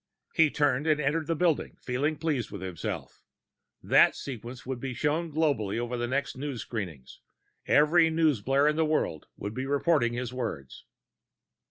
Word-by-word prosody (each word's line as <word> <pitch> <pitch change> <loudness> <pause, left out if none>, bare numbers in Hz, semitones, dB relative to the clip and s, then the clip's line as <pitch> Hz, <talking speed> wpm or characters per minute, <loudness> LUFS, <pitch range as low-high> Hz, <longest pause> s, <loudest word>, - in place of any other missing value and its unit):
He 160 -1 +5
turned 145 0 +1
and 155 -1 +3
entered 150 +2 0
the 165 - +1
building, 165 -2 0
feeling 140 +5 -1
pleased 145 -7 -1
with 100 -2 -8
himself. 90 -3 -5 0.6
That - - +5
sequence 125 -1 -7
would 130 -1 -4
be 130 0 -4
shown 155 +4 0
globally 140 -10 0
on 120 0 -3
the 120 - -1
next 135 +3 -1
news 135 -2 -4
screenings; 90 - -6 0.5
every 160 +3 +5
newsblare 145 -4 +2
in 150 +1 +2
the 160 - +3
world 150 - -1
would 105 - -5
be 130 +3 -4
reporting 140 -3 +2
his 125 0 -4
words. 110 - -5
135 Hz, 160 wpm, -28 LUFS, 120-155 Hz, 0.6 s, He